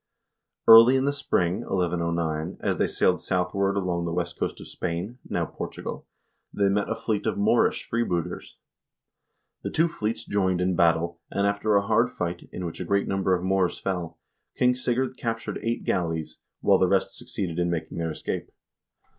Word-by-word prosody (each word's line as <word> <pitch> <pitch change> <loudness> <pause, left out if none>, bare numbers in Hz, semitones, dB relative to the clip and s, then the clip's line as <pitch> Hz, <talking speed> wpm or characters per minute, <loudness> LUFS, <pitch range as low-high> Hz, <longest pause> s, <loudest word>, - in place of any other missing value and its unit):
Early 115 +3 +10
in 130 0 +2
the 140 - +1
spring 90 -9 0
(1109), 85 -4 -1
as - - -1
they - - +2
sailed - - +1
southward 95 +2 0
along 90 -3 -1
the 85 - -2
west 85 0 -2
coast - - -2
of - - -10
Spain 90 +9 -4
(now - - 0
Portugal), - - -7 0.4
they 100 -1 +2
met 100 +1 0
a 115 - 0
fleet 110 -2 -2
of 110 - 0
Moorish 105 +4 +2
freebooters. 90 -7 -2 1.0
The - - -3
two 165 +2 +2
fleets 110 -8 -3
joined 95 -3 +1
in 90 0 +1
battle, 85 0 +2
and 100 - 0
after 100 +1 +1
a 100 0 +3
hard 115 +3 +3
fight, 85 -6 -4
in 90 - -5
which 85 - -6
a - - -2
great 100 +3 +1
number 95 -1 +1
of 90 - -4
Moors 95 -1 +1
fell, 85 -4 -3 0.4
King 125 0 +4
Sigurd 125 +1 -1
captured 115 -1 -3
eight 115 +1 -2
galleys, 80 -3 -2 0.2
while - - +4
the - - +4
rest - - +1
succeeded 90 -3 -4
in 85 0 +1
making 80 -1 -3
their 85 0 -1
escape. 80 - -4
95 Hz, 175 wpm, -26 LUFS, 85-110 Hz, 1.0 s, Early